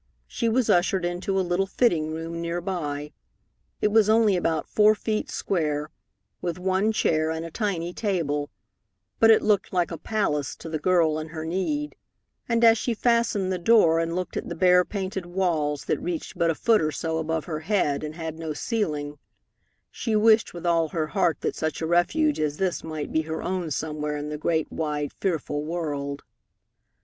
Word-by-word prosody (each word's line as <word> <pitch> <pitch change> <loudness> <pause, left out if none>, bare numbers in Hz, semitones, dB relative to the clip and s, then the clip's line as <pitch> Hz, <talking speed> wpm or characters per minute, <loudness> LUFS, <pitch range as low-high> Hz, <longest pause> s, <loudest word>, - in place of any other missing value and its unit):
She 230 - -1
was 240 +1 +2
ushered 180 +1 +2
into 180 +2 -1
a 185 - 0
little 175 +2 0
fitting 170 -9 +1
room 165 +1 -5
near 170 +1 -2
by. 150 -5 -4 0.7
It 210 - +3
was 215 0 +4
only 220 -3 +4
about 165 -3 0
four 215 0 +4
feet 215 0 -2
square, 150 -5 -1 0.5
with 175 -1 -3
one 190 +3 +1
chair 160 -7 +1
and 160 +1 -3
a 165 - -8
tiny 180 -4 -2
table, 160 -9 -1 0.7
but 225 - +6
it 220 - +6
looked 210 -2 +2
like 175 -2 0
a 165 - -5
palace 150 -10 -1
to 165 - -9
the 155 -1 -2
girl 165 -2 +2
in 155 - -5
her 160 0 -6
need, 290 - -2 0.5
and 230 0 +2
as 225 -1 +7
she 240 - -1
fastened 230 -5 +1
the 180 - -2
door 170 -4 +5
and 165 0 -1
looked 180 -1 -3
at - - -4
the 170 - -4
bare 180 +1 +5
painted 190 -2 -4
walls 165 -6 -1
that - - 0
reached 175 -2 -4
but 170 - +1
a 165 - +1
foot 225 +6 +3
or 155 0 0
so 160 +2 -2
above 160 0 -2
her 155 -3 -4
head 155 -5 0
and 155 0 -5
had 160 -1 -6
no 160 -2 -3
ceiling, 150 - -2 0.7
she 225 -3 -2
wished 220 +1 +4
with 175 0 -8
all 165 -2 +3
her 160 -1 -1
heart 180 -5 +1
that - - -2
such 155 -1 -2
a 160 - -2
refuge 175 - +2
as 150 -1 -1
this 190 -2 -1
might 155 -2 -5
be 160 - +2
her 160 0 -5
own 180 -3 -2
somewhere 150 0 -3
in 145 +1 -5
the 150 - -4
great, 160 0 0
wide, 150 -2 -2
fearful 150 -5 -2
world. 145 -4 -3
170 Hz, 190 wpm, -25 LUFS, 155-195 Hz, 0.7 s, as